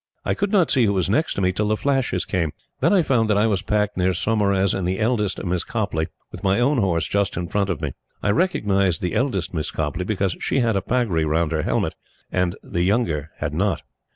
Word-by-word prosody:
I - - +1
could 200 0 -1
not 190 -6 +3
see 125 -4 +4
who 100 - +2
was 95 -1 0
next 155 -2 +1
me 95 -1 +2
till 105 +3 -1
the 110 0 +1
flashes 135 -10 0
came. 85 -6 -1 0.3
Then 170 - +3
I 195 -4 +4
found 115 -7 +2
that 105 - +3
I 105 - +4
was 100 -5 +1
packed 105 0 0
near 90 0 +2
Saumarez 100 -1 +1
and 95 -2 -1
the 95 +1 -1
eldest 110 -3 0
Miss 90 -1 0
Copleigh, 95 -8 -2 0.2
with - - -10
my 95 +3 +2
own 135 +2 +3
horse 85 -6 +1
just 100 -3 0
in 85 0 -2
front 100 +2 0
of 85 -5 -2
me. 75 -3 -2 0.3
I 100 - +3
recognized 100 - +1
the 90 - -1
eldest 100 - -1
Miss 80 -3 -2
Copleigh, 80 +3 -2
because 95 -4 0
she - - 0
had 115 -3 +1
a 95 - +1
pagri 105 -7 0
round 80 +1 +1
her 80 -1 0
helmet, - - 0 0.4
and 90 -1 0
the 85 - -2
younger 85 - +1
had 75 -1 -3
not. 95 +5 0
95 Hz, 230 wpm, -22 LUFS, 85-110 Hz, 0.4 s, see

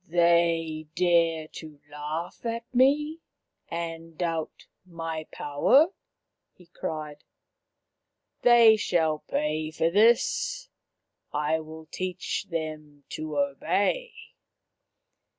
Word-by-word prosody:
" - - -37
They 165 -2 +2
dare 165 -3 +2
to 155 -3 -11
laugh 150 +4 -6
at 230 0 -3
me 295 +5 +3 0.5
and 165 -1 -6
doubt 165 -3 -3 0.2
my 165 -3 -6
power! 270 - +3 0.3
" - - -57
he 180 - -18
cried. 155 -3 -6 0.6
" - - -55
They 235 -2 +7
shall 160 -6 +1
pay 155 +1 -2
for 160 +1 0
this. - - +2 0.6
I 150 +2 0
will 160 0 -10
teach 185 +3 -4
them 155 -3 -5
to 155 0 -5
obey." 440 - 0
165 Hz, 100 wpm, -27 LUFS, 155-220 Hz, 0.6 s, They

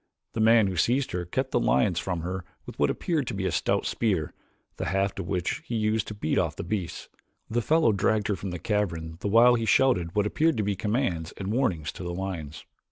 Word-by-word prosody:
The - - -3
man 110 0 +6
who 95 -2 -2
seized 130 - +1
her 90 -1 -3
kept 130 +10 -2
the - - +2
lions 95 -7 +2
from 90 -3 -3
her 90 +2 -4 0.2
with - - -10
what 70 -1 +3
appeared 155 - -1
to 115 - -3
be 95 -1 -2
a 95 - +1
stout 75 - 0
spear, 95 -9 0 0.4
the - - -3
haft 95 0 0
of 90 - -4
which 90 -3 -1
he 120 - -4
used 110 -1 0
to 105 - -6
beat 80 -6 0
off - - -1
the - - -5
beasts. 90 -1 -4 0.4
The 120 +1 +1
fellow 155 -1 +3
dragged 105 +1 +1
her 105 - +2
from 95 - -5
the 90 - -4
cavern 85 -5 -2
the - - -3
while 115 +4 +6
he 115 -2 0
shouted 95 -10 +3
what 105 -1 +2
appeared 155 +6 +1
to 105 - +1
be 100 0 0
commands 100 -6 -1
and 100 +2 -3
warnings 90 - 0
to - - -9
the 85 0 -4
lions. 85 -6 -5
100 Hz, 230 wpm, -27 LUFS, 90-115 Hz, 0.4 s, man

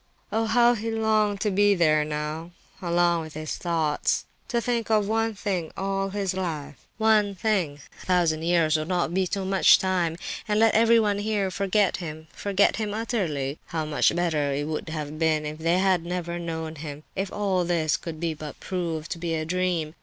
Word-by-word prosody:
Oh! 225 +1 +1
how 240 +2 +5
he 225 -1 -3
longed 215 -2 +1
to 210 - +1
be 205 +1 +4
there 155 -4 +3
now—alone 170 +3 -2
with 155 -1 -9
his 155 0 -4
thoughts—to 165 - -1
think 235 -1 -1
of 210 -2 +3
one 225 0 0
thing 190 -5 -2
all 195 0 -1
his 195 -1 -2
life—one 190 - 0
thing! 180 -8 0 0.2
A - - -12
thousand 170 -4 +2
years 165 -2 +2
would 155 0 -3
not 175 -2 0
be 190 0 +1
too 195 +1 -2
much 190 0 +6
time! 180 -3 0 0.3
And 210 0 +1
let 225 0 +5
everyone 225 -2 +4
here 205 -2 0
forget 200 +1 +1
him—forget 175 +4 -1
him 210 -1 -2
utterly! 170 - -2
How 160 -2 -2
much 155 +2 +2
better 160 -5 0
it 145 +1 -1
would 155 +1 -4
have 155 -1 -5
been 155 -2 +2
if 150 +1 -5
they 165 +2 +2
had 185 -2 +2
never 175 0 -3
known 160 -1 -5
him—if 155 +6 -6
all 195 -3 0
this 170 -3 +1
could 160 -2 -6 0.2
but 150 -2 -8
prove 170 -4 -3
to 170 - -4
be 165 -1 -2
a 155 0 -2
dream. 175 -3 -1
175 Hz, 175 wpm, -26 LUFS, 160-205 Hz, 0.3 s, much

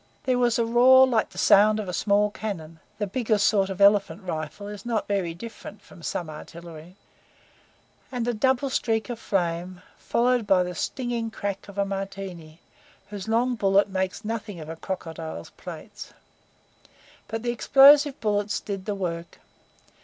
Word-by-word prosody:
There 255 -1 +1
was 240 -2 +2
a 235 - +1
roar 255 +3 +7
like 240 -4 +1
the - - -16
sound 210 +2 +5
of 210 - -4
a 180 - -4
small 205 +1 +2
cannon 165 -7 -6 0.2
(the 210 - -1
biggest 215 0 0
sort 195 -2 +2
of 190 0 -5
elephant 200 0 +4
rifle 160 +3 -5
is 205 -1 -8
not 230 -3 -2
very 190 -5 -1
different 215 +1 -10
from 170 - -16
some 170 +1 -3
artillery), 165 +2 -11 1.2
and 245 -2 -2
a 245 - +1
double 260 +4 +1
streak 225 -1 0
of 235 - -6
flame, 180 -2 -2 0.2
followed 245 -2 +1
by 185 -2 +4
the 180 0 -5
stinging 240 +3 -3
crack 200 -3 -5
of 200 - -12
a 200 - +1
Martini, 195 -5 -6 0.5
whose 205 0 -6
long 235 +3 +2
bullet 200 -2 +2
makes 190 +2 -3
nothing 210 -4 -4
of 155 0 -9
a 165 - -5
crocodile's 165 - -6
plates. - - -10 1.1
But 225 +1 -4
the 240 - 0
explosive 280 +4 +6
bullets 205 -1 0
did 195 -2 -6
the 205 - -2
work. 170 -3 -5
205 Hz, 160 wpm, -25 LUFS, 180-230 Hz, 1.2 s, roar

